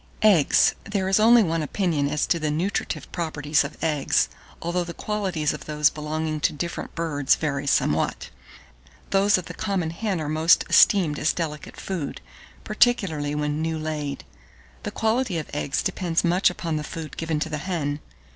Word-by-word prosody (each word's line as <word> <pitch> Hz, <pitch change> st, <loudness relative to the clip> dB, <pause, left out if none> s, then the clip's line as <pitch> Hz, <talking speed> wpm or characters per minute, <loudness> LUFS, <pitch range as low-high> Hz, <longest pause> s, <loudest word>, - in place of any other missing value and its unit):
EGGS. 190 Hz, -9 st, +5 dB
1623. 205 Hz, 0 st, -1 dB
There 190 Hz, 0 st, -1 dB
is 195 Hz, -, +3 dB
only 230 Hz, +1 st, +7 dB
one 165 Hz, -3 st, 0 dB
opinion 155 Hz, -2 st, 0 dB
as 150 Hz, -, +1 dB
to 170 Hz, -, +1 dB
the 155 Hz, -1 st, -1 dB
nutritive 170 Hz, +7 st, -2 dB
properties 155 Hz, -4 st, 0 dB
of 140 Hz, +2 st, -7 dB
eggs, 150 Hz, -4 st, +1 dB, 0.3 s
although 175 Hz, +1 st, -1 dB
the 170 Hz, 0 st, -8 dB
qualities 190 Hz, -8 st, -1 dB
of -, -, -8 dB
those 150 Hz, 0 st, +2 dB
belonging 155 Hz, 0 st, -3 dB
to -, -, +1 dB
different 170 Hz, +3 st, -5 dB
birds 150 Hz, -5 st, +1 dB
vary 140 Hz, -2 st, -2 dB
somewhat. 80 Hz, -, 0 dB, 0.8 s
Those 200 Hz, +1 st, +4 dB
of 180 Hz, -, -5 dB
the -, -, -8 dB
common 190 Hz, -6 st, -2 dB
hen 195 Hz, +1 st, -2 dB
are 155 Hz, -, -3 dB
most 155 Hz, +2 st, +4 dB
esteemed 170 Hz, -8 st, +5 dB
as 155 Hz, -, +2 dB
delicate 150 Hz, -3 st, -5 dB
food, 175 Hz, -7 st, -4 dB, 0.4 s
particularly 195 Hz, -11 st, +1 dB
when 150 Hz, +1 st, -1 dB
"new 160 Hz, 0 st, -1 dB
laid." 150 Hz, -3 st, -4 dB, 0.6 s
The -, -, -4 dB
quality 220 Hz, -2 st, 0 dB
of 155 Hz, -, -5 dB
eggs 145 Hz, -1 st, -1 dB
depends 170 Hz, -3 st, 0 dB
much 175 Hz, +2 st, +3 dB
upon 165 Hz, -3 st, -3 dB
the 150 Hz, -, -3 dB
food 155 Hz, -1 st, -7 dB
given 160 Hz, -2 st, -2 dB
to 160 Hz, -, -2 dB
the 155 Hz, -1 st, -3 dB
hen. 150 Hz, -4 st, -2 dB
160 Hz, 175 wpm, -24 LUFS, 150-185 Hz, 0.8 s, only